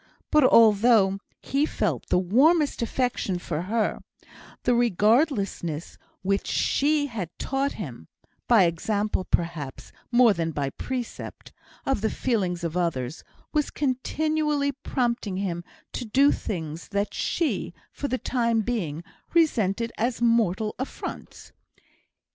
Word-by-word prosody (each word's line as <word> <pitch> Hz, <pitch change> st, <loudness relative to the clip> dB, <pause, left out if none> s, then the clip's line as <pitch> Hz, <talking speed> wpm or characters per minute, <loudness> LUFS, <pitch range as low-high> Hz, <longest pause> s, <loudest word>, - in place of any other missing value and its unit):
But 305 Hz, -1 st, +5 dB
although 220 Hz, -4 st, +5 dB, 0.2 s
he 280 Hz, +3 st, +1 dB
felt -, -, -2 dB
the -, -, +2 dB
warmest 275 Hz, -, +3 dB
affection 235 Hz, -5 st, -1 dB
for 170 Hz, -3 st, -3 dB
her, 215 Hz, +4 st, 0 dB, 0.6 s
the 245 Hz, -, +3 dB
regardlessness 210 Hz, -, +1 dB, 0.2 s
which 195 Hz, +1 st, 0 dB
she 295 Hz, +1 st, +2 dB
had 220 Hz, -, -4 dB
taught 275 Hz, +1 st, -1 dB
him 125 Hz, -, -8 dB, 0.4 s
(by 230 Hz, -5 st, +6 dB
example, 200 Hz, +4 st, 0 dB
perhaps, 165 Hz, -7 st, -2 dB, 0.2 s
more 240 Hz, -2 st, +6 dB
than 165 Hz, -3 st, -2 dB
by 140 Hz, -2 st, -2 dB
precept) 250 Hz, -, -6 dB, 0.3 s
of 270 Hz, -6 st, 0 dB
the 220 Hz, -, +1 dB
feelings 185 Hz, -10 st, -1 dB
of 170 Hz, 0 st, -3 dB
others, 155 Hz, -6 st, -2 dB, 0.3 s
was 300 Hz, -2 st, +1 dB
continually 295 Hz, +2 st, 0 dB
prompting 240 Hz, -7 st, -2 dB
him 175 Hz, -3 st, -2 dB, 0.3 s
to -, -, -3 dB
do 265 Hz, +6 st, +4 dB
things 160 Hz, -4 st, -4 dB
that 200 Hz, 0 st, -2 dB
she, 285 Hz, -, -1 dB, 0.2 s
for 285 Hz, -, -4 dB
the 255 Hz, -, -1 dB
time 235 Hz, -3 st, +1 dB
being, 180 Hz, -9 st, -3 dB, 0.3 s
resented 230 Hz, -, +2 dB
as 235 Hz, +2 st, 0 dB
mortal 225 Hz, -3 st, +2 dB
affronts. 260 Hz, -, -7 dB
220 Hz, 120 wpm, -26 LUFS, 180-260 Hz, 0.6 s, by